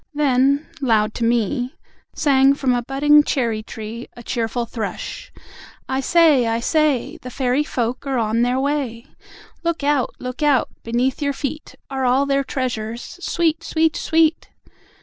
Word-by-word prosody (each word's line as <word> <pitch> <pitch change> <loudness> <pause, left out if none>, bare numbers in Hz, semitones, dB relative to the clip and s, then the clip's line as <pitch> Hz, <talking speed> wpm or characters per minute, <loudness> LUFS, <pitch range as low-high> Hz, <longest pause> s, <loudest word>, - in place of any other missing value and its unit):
Then 280 0 +2 0.2
loud 220 -4 +2
to 235 - -4
me 240 +2 0 0.4
Sang 275 -1 +4
from 265 -3 +1
a 245 - +1
budding 290 +4 +4
cherry 230 -7 -1
tree, 220 +2 -8
A 240 - -10
cheerful 235 0 -2
Thrush... 235 - -6 0.6
"I 265 0 -1
say! 295 -4 +4
I 225 0 0
say! 300 +2 +1
The 250 - -7
Fairy 255 +2 0
Folk 250 0 -3
are 270 -1 0
on 225 0 +1
their 250 +2 +1
way. 270 -4 -2 0.6
Look 335 -3 -2
out! 285 -3 +1
Look 255 +3 -6
out! 290 -4 +3
Beneath 245 +4 -1
your 285 -1 0
feet, 290 +2 -5 0.2
Are 265 -1 -2
all 255 +2 +3
their 275 0 +1
treasures: 240 +2 -4
Sweet! 330 -2 0
Sweet! 320 -1 +1
Sweet! 320 0 +1
265 Hz, 150 wpm, -21 LUFS, 235-290 Hz, 0.6 s, Sang